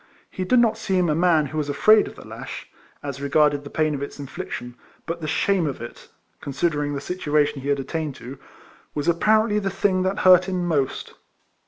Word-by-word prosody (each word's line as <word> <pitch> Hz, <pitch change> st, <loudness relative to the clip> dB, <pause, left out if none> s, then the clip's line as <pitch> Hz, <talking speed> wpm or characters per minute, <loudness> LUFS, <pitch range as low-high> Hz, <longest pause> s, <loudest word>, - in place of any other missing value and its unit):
He 185 Hz, -, -4 dB
did 250 Hz, +7 st, +3 dB
not 235 Hz, -2 st, +3 dB
seem 185 Hz, -3 st, +1 dB
a -, -, +2 dB
man 165 Hz, -2 st, +3 dB
who 155 Hz, +2 st, -4 dB
was 145 Hz, -1 st, -2 dB
afraid 215 Hz, +9 st, +5 dB
of -, -, -10 dB
the -, -, -13 dB
lash, -, -, -8 dB, 0.4 s
as 140 Hz, -1 st, -5 dB
regarded 145 Hz, 0 st, +2 dB
the 145 Hz, -, -9 dB
pain 155 Hz, 0 st, 0 dB
of 140 Hz, -, -4 dB
its 140 Hz, -, -6 dB
infliction, 140 Hz, -4 st, -6 dB, 0.3 s
but 170 Hz, 0 st, -4 dB
the 155 Hz, -, -4 dB
shame 185 Hz, +2 st, +1 dB
of 140 Hz, -, -4 dB
it 120 Hz, -, -10 dB, 0.3 s
(consider 145 Hz, +2 st, -1 dB
ing 145 Hz, 0 st, -3 dB
the -, -, -2 dB
situation 150 Hz, -3 st, 0 dB
he 140 Hz, -, -4 dB
had 140 Hz, -1 st, +1 dB
attained 155 Hz, 0 st, -4 dB
to) 130 Hz, +3 st, -10 dB, 0.6 s
was 145 Hz, -1 st, -2 dB
apparently 210 Hz, +5 st, +3 dB
the 195 Hz, -1 st, -2 dB
thing 195 Hz, -1 st, +1 dB
that 190 Hz, +2 st, -1 dB
hurt 185 Hz, 0 st, +7 dB
him 180 Hz, -2 st, -1 dB
most. 145 Hz, -6 st, -1 dB
155 Hz, 205 wpm, -23 LUFS, 145-185 Hz, 0.6 s, hurt